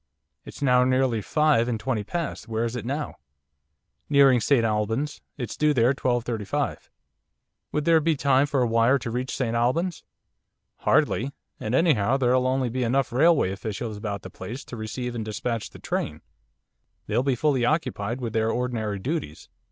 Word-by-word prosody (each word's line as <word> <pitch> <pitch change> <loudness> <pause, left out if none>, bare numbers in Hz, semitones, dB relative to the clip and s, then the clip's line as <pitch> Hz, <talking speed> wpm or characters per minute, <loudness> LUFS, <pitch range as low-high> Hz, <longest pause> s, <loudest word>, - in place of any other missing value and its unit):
It's - - -8
now 125 -2 +5
nearly 130 -3 +2
five 150 -1 +2
and 115 -3 -1
twenty 110 -1 -1
past. 170 - -4
Where's 115 +1 -2
it 115 -3 -5
now?' 145 +4 -3 0.9
'Nearing 140 -3 +6
St 120 -1 +3
Albans, 110 +7 -1 0.2
it's 120 -6 -4
due 150 -1 +2
there 120 +2 +4
12.35.' 120 -5 -2 0.8
'Would 150 0 -1
there 165 -1 +5
be 160 +1 +1
time 140 0 +3
for 140 -3 +1
a - - +2
wire 115 +4 +4
to 120 -3 -5
reach 125 +2 -3
St 115 -3 -1
Albans?' 155 +10 0 0.7
'Hardly, 130 +5 +2 0.3
and 110 +3 -2
anyhow 135 - +3
there'll 130 -1 +2
only 130 -1 +1
be 125 +2 -2
enough 130 +1 +1
railway 150 - +4
officials 110 +2 -4
about 105 -2 -5
the - - -9
place 115 +9 -7
to - - -8
receive 120 +3 -4
and 115 -2 -3
despatch 110 +1 -3
the - - -13
train. 75 +1 -3 0.8
They'll - - +1
be 135 -1 +1
fully 135 -1 +1
occupied 120 -5 -1
with 115 -2 -4
their 110 -1 +1
ordinary 115 -4 -2
duties. 130 - -4
125 Hz, 165 wpm, -25 LUFS, 115-140 Hz, 0.9 s, Nearing